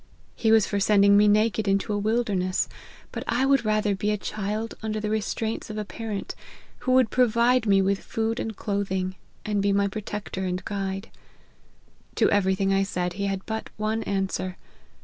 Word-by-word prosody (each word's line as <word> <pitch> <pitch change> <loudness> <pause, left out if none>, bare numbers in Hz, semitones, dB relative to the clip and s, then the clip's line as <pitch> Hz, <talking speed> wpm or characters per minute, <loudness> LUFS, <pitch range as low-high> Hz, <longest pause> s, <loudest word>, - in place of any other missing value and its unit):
He 220 - +2
was 220 -2 +6
for 205 - -1
sending 200 0 +5
me 210 +1 +6
naked 215 0 +2
into 195 +2 +1
a - - 0
wilderness; 205 -4 0 0.4
but - - -5
I 260 - +2
would 275 -1 +3
rather 215 -1 +1
be 200 +2 -1
a 210 - +1
child 215 +2 -3
under 215 -1 -2
the 210 0 -2
restraints 220 +1 -2
of 215 - -5
a 210 - -3
parent, 210 +1 -5 0.5
who 255 - 0
would 255 -3 +4
provide 240 0 +3
me 195 -1 +4
with 195 +1 +1
food 225 +1 -2
and 220 -2 -4
clothing, 190 -3 -2 0.3
and 210 -1 0
be 200 0 +2
my 200 0 +2
protector 205 -1 -5
and 185 0 -3
guide. 195 0 -4 1.0
To - - +3
every 190 -2 +3
thing 195 0 +1
I 195 - +3
said, 180 -2 -2
he 200 +2 -2
had 195 -1 -3
but 220 0 -4
one 215 +1 -1
answer. 190 -1 -2
205 Hz, 185 wpm, -25 LUFS, 195-220 Hz, 1.0 s, was